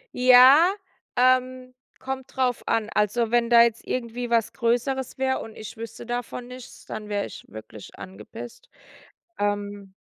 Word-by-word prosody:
Ja, 255 Hz, +7 st, +7 dB, 0.4 s
ähm, 255 Hz, 0 st, +1 dB, 0.3 s
kommt 265 Hz, 0 st, -6 dB
drauf 255 Hz, -2 st, 0 dB
an. 225 Hz, -2 st, 0 dB
Also, 220 Hz, +2 st, 0 dB
wenn 240 Hz, -1 st, +2 dB
da 235 Hz, -1 st, +7 dB
jetzt 230 Hz, -1 st, -1 dB
irgendwie 240 Hz, 0 st, -4 dB
was 230 Hz, -2 st, +1 dB
Größeres 245 Hz, +2 st, -1 dB
wäre 260 Hz, 0 st, 0 dB
und 225 Hz, -, -9 dB
ich 215 Hz, +1 st, -9 dB
wüsste 225 Hz, +1 st, -9 dB
davon 245 Hz, 0 st, -5 dB
nichts, 250 Hz, 0 st, -12 dB
dann 215 Hz, -1 st, -7 dB
wäre 205 Hz, -1 st, -1 dB
ich -, -, -11 dB
wirklich 110 Hz, 0 st, -12 dB
angepisst. 105 Hz, +5 st, -11 dB, 0.7 s
Ähm 205 Hz, -1 st, -3 dB
235 Hz, 145 wpm, -24 LUFS, 215-255 Hz, 0.7 s, Ja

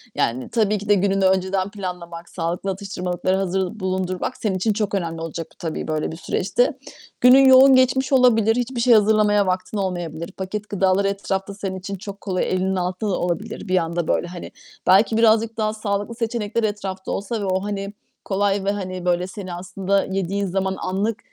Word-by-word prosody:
Yani, 125 Hz, +2 st, -1 dB
tabii 215 Hz, -2 st, +1 dB
ki 205 Hz, +1 st, -8 dB
de 205 Hz, -, +6 dB
gününü 195 Hz, 0 st, +1 dB
önceden 190 Hz, +1 st, +1 dB
planlamak, 175 Hz, -4 st, -7 dB
sağlıklı 175 Hz, +3 st, -3 dB
atıştırmalıkları 185 Hz, -1 st, -2 dB
hazır 190 Hz, +2 st, -2 dB
bulundurmak 185 Hz, +4 st, -2 dB
senin 205 Hz, -4 st, -1 dB
için 210 Hz, +3 st, +1 dB
çok 210 Hz, -1 st, -2 dB
önemli 165 Hz, -3 st, -3 dB
olacak 165 Hz, 0 st, -5 dB
tabii 165 Hz, -2 st, -4 dB
böyle 155 Hz, 0 st, -1 dB
bir 165 Hz, -, -7 dB
süreçte. 220 Hz, -, 0 dB, 0.5 s
Günün 260 Hz, +2 st, +7 dB
yoğun 265 Hz, 0 st, +8 dB
geçmiş 260 Hz, +1 st, +3 dB
olabilir, 225 Hz, -4 st, +4 dB
hiçbir 245 Hz, 0 st, -2 dB
şey 240 Hz, -1 st, +5 dB
hazırlamaya 210 Hz, -2 st, +4 dB
vaktin 185 Hz, +3 st, -2 dB
olmayabilir. 175 Hz, -4 st, -3 dB
Paket 205 Hz, +3 st, -5 dB
gıdalar 195 Hz, 0 st, +2 dB
etrafta 195 Hz, 0 st, -2 dB
senin 195 Hz, -2 st, -5 dB
için 195 Hz, +2 st, -5 dB
çok 200 Hz, +1 st, -9 dB
kolay, 185 Hz, -3 st, -1 dB
elinin 190 Hz, +1 st, 0 dB
altında 185 Hz, +3 st, -2 dB
da -, -, -1 dB
olabilir 195 Hz, +4 st, -3 dB
bir 185 Hz, 0 st, +2 dB
anda 170 Hz, -1 st, -1 dB
böyle, 175 Hz, -, 0 dB
hani. 175 Hz, 0 st, -8 dB, 0.4 s
Belki 210 Hz, +4 st, +5 dB
birazcık 225 Hz, 0 st, +3 dB
daha 215 Hz, 0 st, 0 dB
sağlıklı 205 Hz, +1 st, -3 dB
seçenekler 230 Hz, -1 st, -2 dB
etrafta 195 Hz, -3 st, -3 dB
olsa 205 Hz, +2 st, -3 dB
ve -, -, -2 dB
o, 190 Hz, +1 st, 0 dB
hani, 200 Hz, 0 st, -4 dB, 0.3 s
kolay 200 Hz, 0 st, 0 dB
ve, 200 Hz, -, +2 dB
hani, 185 Hz, -3 st, -5 dB
böyle 180 Hz, +1 st, +1 dB
seni 185 Hz, -2 st, -7 dB
aslında 190 Hz, +2 st, -1 dB
yediğin 195 Hz, +1 st, -2 dB
zaman 190 Hz, +1 st, -1 dB
anlık, 200 Hz, +4 st, -1 dB
195 Hz, 175 wpm, -22 LUFS, 185-215 Hz, 0.5 s, yoğun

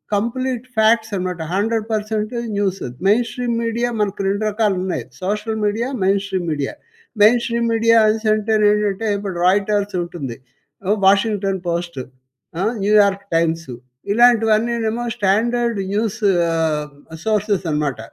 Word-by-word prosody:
Complete 250 Hz, +3 st, -2 dB
facts 220 Hz, 0 st, +3 dB
అనమాట. 180 Hz, -1 st, -3 dB, 0.2 s
100% 215 Hz, 0 st, -1 dB, 0.2 s
news. 195 Hz, -1 st, -1 dB, 0.3 s
Main 235 Hz, +3 st, +3 dB
stream 240 Hz, 0 st, -2 dB
media 235 Hz, +1 st, -1 dB
మనకు 200 Hz, -1 st, -1 dB
2 200 Hz, +2 st, -1 dB
రకాలు 210 Hz, -2 st, +1 dB
ఉన్నాయి 175 Hz, -11 st, -3 dB, 0.2 s
social 210 Hz, +3 st, -2 dB
media, 225 Hz, +4 st, -1 dB, 0.2 s
main 195 Hz, +1 st, +2 dB
stream 190 Hz, -3 st, -3 dB
media. 145 Hz, -2 st, -3 dB, 0.5 s
Main 235 Hz, +3 st, +6 dB
stream 235 Hz, -1 st, 0 dB
media 230 Hz, 0 st, +4 dB
అనేసి 220 Hz, +1 st, 0 dB
అంటే 215 Hz, +1 st, -1 dB, 0.2 s
ఏంటంటే 210 Hz, 0 st, 0 dB
ఇప్పుడు 195 Hz, -3 st, -5 dB
రాయిటర్స్ 205 Hz, +1 st, +1 dB
ఉంటుంది. 155 Hz, -9 st, -6 dB, 0.5 s
ఆ! -, -, -2 dB, 0.2 s
'వాషింగ్టన్ 200 Hz, -1 st, +2 dB
పోస్ట్' 170 Hz, -4 st, -3 dB, 0.6 s
ఆహ్, 220 Hz, +4 st, +1 dB
'న్యూయార్క్ 200 Hz, -1 st, +3 dB
టైమ్స్' 165 Hz, -2 st, 0 dB, 0.4 s
ఇలాంటివన్నీ 230 Hz, 0 st, +4 dB, 0.2 s
ఏమో 235 Hz, +2 st, -3 dB
స్టాండర్డ్ 230 Hz, +4 st, +1 dB
న్యూసు 215 Hz, 0 st, -1 dB, 1.0 s
సోర్సెస్ 210 Hz, -2 st, 0 dB
అనమాట. 150 Hz, -5 st, -1 dB
210 Hz, 125 wpm, -19 LUFS, 195-225 Hz, 1.0 s, Main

